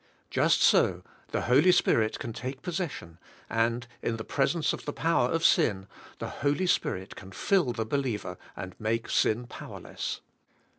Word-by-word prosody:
Just - - +3
so - - +4 0.2
the - - -2
Holy 140 +9 +5
Spirit 110 -10 +3
can 115 - -5
take 130 +3 -6
possession, 165 - -4 0.3
and 115 +2 +1 0.2
in 115 - -1
presence 140 +8 0
of - - -7
the 145 - -3
power 160 -6 +2
of 165 +3 0
sin 105 - +3 0.3
the - - -4
Holy 145 +6 +1
Spirit 95 - 0
can 95 - -11
fill 185 - +2
the 115 -2 -2
believer 110 -8 -2 0.2
and 95 -1 -6
make 115 +1 -1
sin 115 +3 +2
powerless. 120 - -6
120 Hz, 150 wpm, -28 LUFS, 110-150 Hz, 0.3 s, Holy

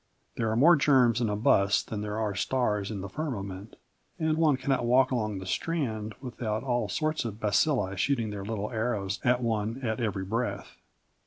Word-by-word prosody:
There 115 - -1
are 110 - 0
more 160 +9 +7
germs 130 -5 +4
in 115 - +1
a 105 - 0
bus 100 -2 +3
than 105 -2 -5
there 105 0 -3
are 110 -2 -1
stars 105 -1 0
in 105 -3 -4
the 100 - -5
firmament, 100 -6 -5 0.4
and 160 -1 +1
one 155 -4 +3
cannot 135 0 0
walk 130 +2 +4
along 110 -5 -1
the 95 - -7
Strand 110 - -2
without 115 -4 -3
all 120 -5 -1
sorts 155 -2 -1
of 110 -2 -5
bacilli 105 -1 +1
shooting 115 -1 0
their 100 -1 -5
little 105 +1 -3
arrows 110 -4 -2
at 125 0 +2
one 110 +1 -1
at 110 -1 -1
every 100 -5 -2
breath. 105 -1 -3
110 Hz, 185 wpm, -28 LUFS, 105-130 Hz, 0.4 s, more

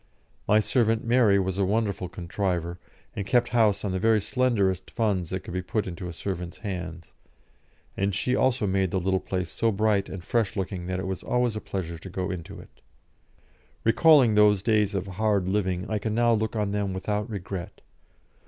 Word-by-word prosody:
My 105 - +5
servant 115 0 +1
Mary 115 -4 +4
was 95 0 -1
a - - +3
wonderful 100 -2 -1
contriver, 90 -1 -3 0.4
and 100 - -2
kept 120 +3 +2
house 110 -4 +2
on 100 - -1
the 95 - -1
very 110 +2 +4
slenderest 100 -6 0
funds 100 -7 0
that 95 0 -3
could - - -9
be 90 - -1
put 105 +4 -2
into 90 0 -6
a - - -5
servant's 90 0 -5
hands, 90 -5 -6 0.8
and 100 -1 0
she 125 +6 0
also 130 -3 +2
made 95 -1 +1
the 95 - 0
little 95 +1 +1
place 90 -3 -3
so 115 -1 +1
bright 105 -1 +1
and 95 -2 -7
fresh 115 -5 0
looking 90 -2 -3
that 90 0 -2
it 95 - -4
was 95 -2 -3
always 125 -2 0
a 110 - -4
pleasure 85 -4 -5
to 95 - -9
go 90 +1 -3
into 85 -3 -7
it. - - -16 1.0
Recalling 130 0 +5
those 105 -2 +4
days 105 -2 +2
of 95 -1 -1
"hard 100 0 0
living," 95 -2 0
I 110 - -1
can 110 +1 -2
now 120 0 +4
look 110 0 -1
on 105 -2 0
them 100 -2 -1
without 105 +3 -2
regret. 95 -3 -6
100 Hz, 190 wpm, -26 LUFS, 95-110 Hz, 1.0 s, My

